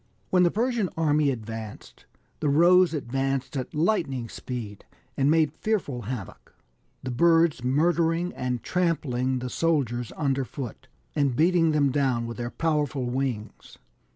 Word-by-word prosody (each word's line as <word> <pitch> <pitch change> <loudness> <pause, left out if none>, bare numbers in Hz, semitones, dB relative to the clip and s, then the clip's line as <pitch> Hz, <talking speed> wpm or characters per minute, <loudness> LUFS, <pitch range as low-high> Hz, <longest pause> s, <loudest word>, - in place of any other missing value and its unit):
When 185 - +4
the 175 - +5
Persian 230 -1 0
army 150 -2 +2
advanced, 110 -3 -7 0.3
the 150 - 0
Rohs 175 +4 +5
advanced 135 +1 -2
at 130 +1 -4
lightning 150 - 0
speed, 110 -6 -7 0.3
and 140 +1 +2
made 155 -2 +3
fearful 160 - -2
havoc, 115 -3 -7 0.5
the 130 - -3
birds 165 0 +3
murdering 165 +5 +1
and 125 -2 -3
trampling 135 -8 0
the 125 0 -4
soldiers 125 -8 0
under 135 -3 0
foot, 130 +1 -7 0.3
and 140 -5 +1
beating 165 +2 +3
them 145 -3 +2
down 130 -4 +1
with 115 0 -6
their 120 -1 -3
powerful 150 -3 -1
wings. 125 -5 -4
140 Hz, 135 wpm, -26 LUFS, 125-165 Hz, 0.5 s, the